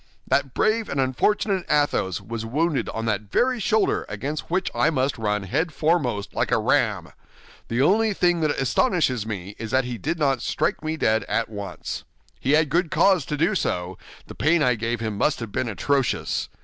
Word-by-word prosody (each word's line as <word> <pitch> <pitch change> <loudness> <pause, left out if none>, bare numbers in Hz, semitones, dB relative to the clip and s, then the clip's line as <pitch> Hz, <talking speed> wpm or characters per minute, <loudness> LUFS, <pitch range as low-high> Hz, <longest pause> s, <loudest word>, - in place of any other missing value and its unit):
That 140 -2 0
brave 220 0 +1
and 140 - -2
unfortunate 185 - +1
Athos 145 - +1
was 115 0 -5
wounded 145 +6 0
on 115 0 -4
that 105 -2 -2
very 255 0 +2
shoulder 220 -1 +1
against 140 +9 -4
which 185 +2 0
I - - +3
must 135 -4 0
run 105 -2 0
head 160 - -1
foremost, 140 -9 0
like - - -1
a - - +4
ram. - - +1 0.6
The 120 +3 +1
only 215 +7 +3
thing 175 -2 +2
that 155 - +2
astonishes 135 - +1
me 100 -1 -5
is 115 -1 -5
that 130 +3 +2
he 120 -2 -5
did 160 +3 -2
not 135 -5 +1
strike - - -1
me 155 +1 -2
dead 110 -6 +2
at 115 - -1
once. 100 -2 -6 0.4
He 135 - +1
had 155 -1 +4
good 170 +2 +1
cause 185 -5 +3
to 150 - -2
do 165 +8 +2
so; 90 - -2 0.3
the - - -10
pain 160 +2 +2
I 125 -2 +4
gave 115 +1 -2
him 110 -3 -3
must 150 - +1
have 115 -3 -6
been 125 - -1
atrocious. 135 +3 0
135 Hz, 190 wpm, -24 LUFS, 115-165 Hz, 0.6 s, a